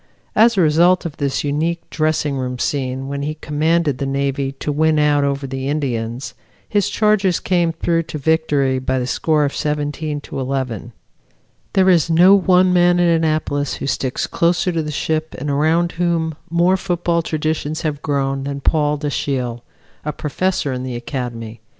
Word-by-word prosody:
As 225 0 +5
a - - +5
result 170 +3 +4
of 160 -3 -5
this 140 -2 -1
unique 160 +4 -1
dressing 155 -2 0
room 125 -1 -3
scene 130 0 -2
when 140 0 -4
he 150 +2 -3
commanded 155 -1 0
the 140 - -2
Navy 135 0 -1
to 145 +2 -4
win 155 +1 +2
out 150 -1 +3
over 140 0 -1
the 135 0 -4
Indians, 125 -4 -3 0.3
his 205 -2 +1
charges 210 -5 +2
came 175 -2 +1
through 165 +1 0
to - - -4
victory 145 -3 +1
by 130 0 -1
the 125 - -1
score 150 +3 +1
of 140 - -2
17 150 0 -2
11. 130 -4 -3 0.8
There 190 -1 +4
is 170 -4 +4
no 175 +4 +6
one 185 -2 +4
man 175 0 +4
at 170 -1 +4
Annapolis 155 -3 0
who - - -5
sticks 135 -1 -1
closer 175 +2 +1
to 165 -2 -1
the 150 - -5
ship 155 +1 -2
and 145 +2 -3
around 160 +4 +2
whom 170 -2 0 0.2
more 175 +3 +3
football 175 -2 0
traditions 155 0 -2
have 150 -2 -2
grown 135 -2 -1
than 140 0 -4
Paul 150 0 +1
Dashiell, 135 -5 -2 0.4
a 150 - -2
professor 150 0 -1
in 125 - -4
the 130 -1 -4
Academy. 120 -3 -5
150 Hz, 170 wpm, -19 LUFS, 135-170 Hz, 0.8 s, no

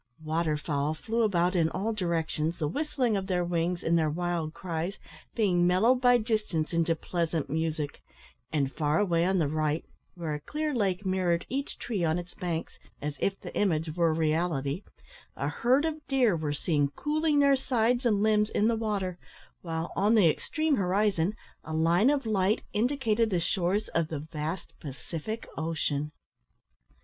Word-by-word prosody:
Water 155 0 0
fowl 150 0 -1
flew 225 +8 -1
about 180 -4 +2
in 165 -2 +3
all 205 +6 -2
directions, 170 -4 -1
the 155 - -1
whistling 260 - 0
of 190 -1 -2
their 180 -2 +1
wings 175 +1 -1
and 170 +1 +3
their 155 -1 +2
wild 170 0 -2
cries 170 +2 -4 0.4
being 180 -6 +3
mellowed 225 +8 +4
by 245 -1 +6
distance 215 -9 -1
into 165 0 +2
pleasant 165 -3 -2
music; 155 -2 -2 0.5
and, 140 -3 0
far 150 0 +1
away 170 -4 +2
on 190 +1 +2
the 160 -4 +2
right, 155 +1 -1 0.3
where 165 -4 -3
a 150 - -3
clear 300 - -3
lake 200 -5 0
mirrored 180 -2 +1
each 275 +3 -3
tree 210 -7 -2
on 160 0 +2
its 175 0 -7
banks, 170 -3 -4 0.2
as 150 0 -3
if 195 0 0
the - - -9
image 160 -5 0
were 170 -2 +3
reality, 155 -1 0 0.5
a - - -2
herd 260 +6 +2
of 315 -1 -2
deer 250 -8 +3
were 155 -2 -2
seen 145 0 +1
cooling 305 0 +1
their 280 -1 +5
sides 245 -2 +1
and 210 -4 +2
limbs 210 -1 +3
in 210 - +2
the 230 - +2
water, 200 -5 -2 0.4
while, 165 -1 -4
on 205 +5 +3
the 205 -6 +6
extreme 310 - 0
horizon, 195 -1 +1 0.3
a 160 - -6
line 170 +9 +4
of 285 -3 +1
light 205 -1 +1
indicated 230 -1 +1
the 180 -4 +1
shores 190 +4 0
of 165 -1 0
the 160 - -4
vast 155 +3 -5
Pacific 160 - -6
Ocean. 150 -2 -1
175 Hz, 170 wpm, -29 LUFS, 160-215 Hz, 0.5 s, by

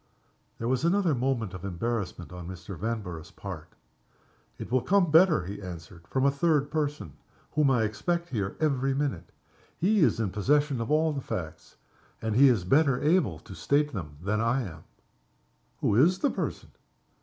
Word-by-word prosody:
There 115 - -3
was 130 +2 0
another 175 -1 +2
moment 120 -6 -1
of 95 -1 -8
embarrassment 100 -2 -3
on 90 -1 -8
Mr. 90 +1 -8
Vanborough's 90 -5 -4
part. - - -9 0.8
"It - - -8
will 130 0 +3
come 185 -1 +2
better," 160 - +5
he 100 +3 -6
answered, 85 -2 -9
"from 130 0 0
a 140 - +5
third 145 0 +1
person, 145 - -2 0.4
whom 150 -2 +3
I 125 -4 +3
expect 170 +11 -2
here 100 -5 -3
every 135 -3 +1
minute. 135 - -2 0.5
He 205 +5 +2
is 155 - +3
in 105 -5 -1
possession 140 +4 +1
of 115 - -4
all 155 +1 +2
the 140 - -3
facts 80 -8 -6 0.4
and 110 -1 -2
he 140 +4 +7
is 115 -8 +2
better 135 - +3
able 150 - +2
to - - -11
state 145 - +1
them 75 -7 -6
than 105 +3 0
I 120 +3 +1
am." 85 -6 -9 1.0
"Who - - +2
is 165 +10 +5
the 285 - +1
person?" - - -4
125 Hz, 170 wpm, -28 LUFS, 95-150 Hz, 1.0 s, he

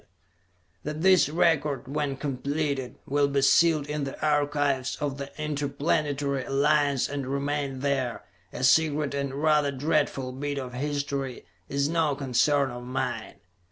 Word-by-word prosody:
] 90 -1 -41
That 150 +2 -4
this 185 -5 +5
record, 150 -4 +1
when 140 -1 -2
completed, 140 -1 -2
will 145 +1 +2
be 140 -1 0
sealed 160 0 +4
in 150 0 -3
the 135 - -5
archives 145 -3 +1
of 140 -1 -3
the 140 0 -5
Interplanetary 145 -1 -1
Alliance 140 0 +2
and 140 -2 -4
remain 140 -1 -2
there, 135 -4 -1 0.3
a - - -5
secret 150 +1 +3
and 140 -1 -2
rather 150 -2 +3
dreadful 140 -2 0
bit 145 +2 -4
of 130 -2 -5
history, 140 -1 -3 0.2
is 140 0 +1
no 160 -3 +1
concern 140 +1 +2
of 120 0 -7
mine. 125 +1 -3
140 Hz, 140 wpm, -27 LUFS, 135-150 Hz, 0.3 s, this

